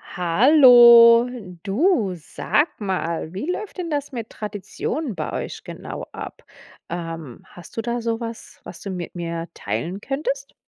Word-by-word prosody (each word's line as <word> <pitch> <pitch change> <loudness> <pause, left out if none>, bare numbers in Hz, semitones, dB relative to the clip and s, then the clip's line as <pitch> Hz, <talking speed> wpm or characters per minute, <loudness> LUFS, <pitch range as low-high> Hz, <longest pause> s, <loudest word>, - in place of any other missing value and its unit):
Hallo, 235 - +7 0.4
du, 220 - +1
sag 290 - 0
mal, 170 -5 -3
wie 205 - -4
läuft 400 +1 -6
denn 345 -2 -4
das 290 -1 -3
mit 230 -4 -6
Traditionen 210 - -5
bei - - -4
euch - - -5
genau - - -7
ab? - - -9 0.5
Ähm, 165 -6 -6
hast 175 +4 -15
du - - 0
da 240 +1 -3
so 230 -1 -2
was, 230 -1 -8
was 170 - -10
du 200 - -6
mit 180 -1 -6
mir 170 -1 -4
teilen 120 - -4
könntest? - - -3
225 Hz, 145 wpm, -22 LUFS, 175-265 Hz, 0.5 s, Hallo